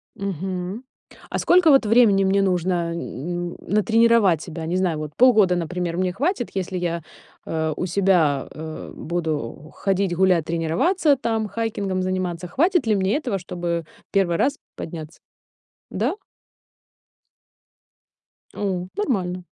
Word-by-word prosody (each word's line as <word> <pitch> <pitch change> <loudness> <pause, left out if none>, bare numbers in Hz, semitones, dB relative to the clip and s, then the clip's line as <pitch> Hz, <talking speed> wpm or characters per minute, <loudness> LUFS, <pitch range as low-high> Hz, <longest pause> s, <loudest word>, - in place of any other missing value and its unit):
Мгм. 190 - -4 0.5
А - - -2
сколько 355 -3 +5
вот 270 -5 +5
времени 210 -4 +5
мне 195 +1 +3
нужно 180 -2 0
н 170 +3 -4
н - - -12
натренировать 215 -4 +3
себя? 165 -1 -6
Не 175 - -1
знаю, 180 -4 0
вот 150 -1 -5
полгода, 215 -8 +5
например, 175 0 -2
мне 185 -1 0
хватит, 290 - -1
если 190 -1 -3
я, 170 -1 -2 0.5
э, 160 -1 -1
у 180 - -2
себя, 175 -7 +2
э, 155 0 -7
буду 155 -4 -4
ходить, 195 -2 0
гулять, 180 -3 +3
тренироваться 175 - +2
там, 225 -3 -1
хайкингом 205 -4 -2
заниматься. 185 -2 -2
Хватит 335 - +2
ли 215 -2 +2
мне 190 +2 +1
этого, 240 -10 -2
чтобы 175 -2 -3 0.3
1 190 -4 +2
раз 280 +1 +1 0.2
подняться? 160 -1 -8 0.7
Да? - - -1 2.4
У, 185 -3 -2
нормально. 185 - -1
185 Hz, 130 wpm, -23 LUFS, 170-210 Hz, 2.4 s, сколько